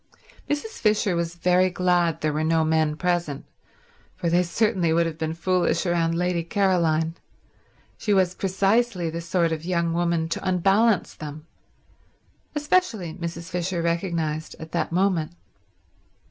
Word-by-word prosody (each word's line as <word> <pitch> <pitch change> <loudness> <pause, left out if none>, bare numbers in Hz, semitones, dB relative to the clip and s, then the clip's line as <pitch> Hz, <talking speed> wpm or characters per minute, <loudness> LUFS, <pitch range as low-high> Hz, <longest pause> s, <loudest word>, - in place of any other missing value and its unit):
Mrs. 295 +10 -3
Fisher 210 -3 +2
was 170 0 -2
very 180 +2 +3
glad 175 -3 +1
there 155 -1 0
were 155 +1 -1
no 160 0 +2
men 155 -1 +1
present, 170 -4 -1 0.7
for 170 - -2
they 175 +1 +4
certainly 180 -2 +1
would 170 +1 +3
have 165 -1 -5
been 160 0 -2
foolish 175 +1 +1
about 165 -1 +1
Lady 175 0 0
Caroline. 170 -4 +1 0.9
She 210 - -1
was 185 -3 +3
precisely 195 -1 +1
the 170 +1 -4
sort 170 0 0
of 160 -1 -3
young 170 -1 0
woman 170 -1 0
to - - -3
unbalance 195 +3 +2
them; 150 0 -8 1.1
especially, 295 - 0
Mrs. 170 0 -6
Fisher 175 -1 -2
recognized, 165 -3 -2
at 160 0 -9
that 170 - -1
moment. 175 -3 +1
170 Hz, 140 wpm, -24 LUFS, 165-185 Hz, 1.1 s, they